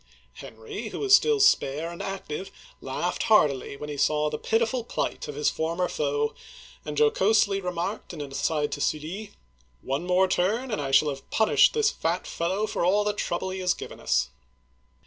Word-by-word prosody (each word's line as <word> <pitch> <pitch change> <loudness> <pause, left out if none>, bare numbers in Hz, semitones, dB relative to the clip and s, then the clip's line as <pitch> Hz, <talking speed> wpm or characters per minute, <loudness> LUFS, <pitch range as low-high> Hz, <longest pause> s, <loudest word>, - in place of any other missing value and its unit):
Henry, 435 -3 -8
who - - -6
was 400 -1 +6
still 445 0 +3
spare 165 - +3
and 170 - -8
active, 195 -2 -5 0.3
laughed - - -3
heartily 140 -10 +3
when 150 - -7
he 145 -1 -5
saw 150 +1 +1
the 150 - -4
pitiful 230 +5 0
plight 235 - -3
of 150 - -6
his 150 +1 +1
former 170 +3 -1
foe, 145 0 -1 0.5
and 150 -1 -6
jo 150 0 +5
cosely 200 -1 +2
remarked 180 +3 -4
in 170 - -8
an 145 -2 -6
aside 150 +1 -1
to 145 - -4
Sully, 180 +10 -3 0.2
" 65 +1 -36
One 140 +6 -2
more 185 +1 +3
turn, 220 +9 0
and 210 - -1
I 135 - -3
shall 135 +2 +4
have 135 -1 -7
punished 220 -1 +4
this 440 -1 +3
fat 170 +3 -2
fellow 190 +5 -1
for 215 - -2
all 200 +4 +3
the 210 0 0
trouble 190 -2 -3
he 190 - -5
has 180 -1 +1
given - - -9
us - - 0
175 Hz, 190 wpm, -26 LUFS, 150-210 Hz, 0.5 s, was